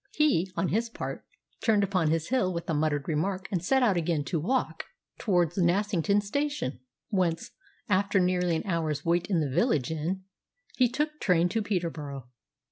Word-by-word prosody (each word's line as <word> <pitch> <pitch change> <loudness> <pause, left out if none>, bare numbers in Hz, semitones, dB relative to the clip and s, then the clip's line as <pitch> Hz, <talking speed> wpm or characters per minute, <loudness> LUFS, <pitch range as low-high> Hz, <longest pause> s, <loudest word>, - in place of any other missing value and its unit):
He, 265 - +2
on 170 +2 +1
his 230 +3 0
part, - - -6 0.4
turned 215 -3 +4
upon 185 -5 +1
his 165 0 0
heel 240 -8 +2
with 170 -1 -4
a 165 - 0
muttered 145 -2 0
remark 185 +5 -1
and 180 -4 -1
set 265 +6 +3
out 205 -7 +3
again 165 -3 0
to 155 +4 -2
walk 250 - -1 0.3
towards 175 -4 +1
Nassington 200 +2 +2
Station, 285 - -2 0.3
whence, 175 -5 0 0.4
after 200 0 +2
nearly 180 -1 +2
an 160 - -3
hour's 160 -5 -1
wait 170 +1 +1
in 175 -5 +2
the 140 -4 -2
village 155 - +2
inn, 170 +5 -2 0.5
he 250 -2 +4
took 300 +4 -2
train 180 -2 +3
to 225 - 0
Peterborough. 160 - -3
180 Hz, 170 wpm, -28 LUFS, 160-205 Hz, 0.5 s, turned